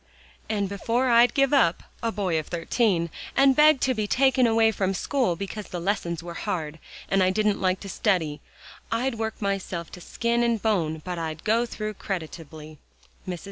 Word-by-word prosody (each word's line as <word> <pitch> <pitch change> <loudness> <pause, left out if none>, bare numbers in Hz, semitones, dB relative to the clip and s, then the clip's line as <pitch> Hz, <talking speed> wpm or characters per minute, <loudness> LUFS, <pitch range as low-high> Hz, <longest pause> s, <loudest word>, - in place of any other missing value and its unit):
"And 205 -2 0
before 230 +6 0
I'd 235 +1 +5
give 275 0 +3
up, 230 -12 +3 0.2
a 230 - 0
boy 185 -7 0
of 155 - -7
thirteen, 175 -1 0 0.2
and 270 -1 +5
beg 300 -1 +6
to 260 - +2
be 215 -3 -2
taken 260 +1 +3
away 225 0 +4
from 195 -2 -1
school 245 -3 0
because 200 +3 -6
the 175 - -5
lessons 170 -3 -2
were 170 0 -7
hard, 165 -5 -4 0.3
and 195 - +2
I 185 - +4
didn't 210 +1 +1
like 185 0 +1
to 200 - -7
study, 165 -9 0 0.5
I'd 230 +1 -1
work 220 -1 -3
myself 195 -4 -3
to 180 - -10
skin 235 +5 -1
and 235 -2 +1
bone 165 -8 0
but 180 -2 -4
I'd 160 -1 -5
go 230 +3 +2
through 215 -2 -5
creditably." 160 -5 -7
200 Hz, 180 wpm, -25 LUFS, 170-230 Hz, 0.5 s, beg